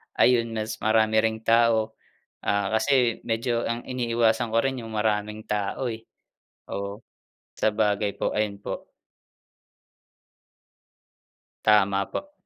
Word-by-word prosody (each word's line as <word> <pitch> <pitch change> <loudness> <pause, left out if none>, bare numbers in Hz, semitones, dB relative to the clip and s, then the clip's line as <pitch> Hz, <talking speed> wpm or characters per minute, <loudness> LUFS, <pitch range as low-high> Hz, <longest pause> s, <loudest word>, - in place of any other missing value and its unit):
ayun, 115 -2 +3
mas 110 0 -3
marami 110 0 +3
ring 110 0 0
tao, 115 -1 +3 0.5
ah, 100 -1 0
kasi 125 0 +2
medyo 115 +1 0
ang 115 +1 -3
iniiwasan 120 -2 +1
ko 115 - +3
rin 135 -1 -1
yung 110 - -8
maraming 105 0 -1
tao, 105 +4 -1
eh. 115 -1 -5 0.7
Oo. 100 +1 -4 0.6
Sabagay 105 -1 +1
po, - - 0
ayun 105 -2 -1
po. - - -6 2.7
Tama 100 -2 +4
po. 290 0 -5
110 Hz, 110 wpm, -25 LUFS, 105-115 Hz, 2.7 s, Tama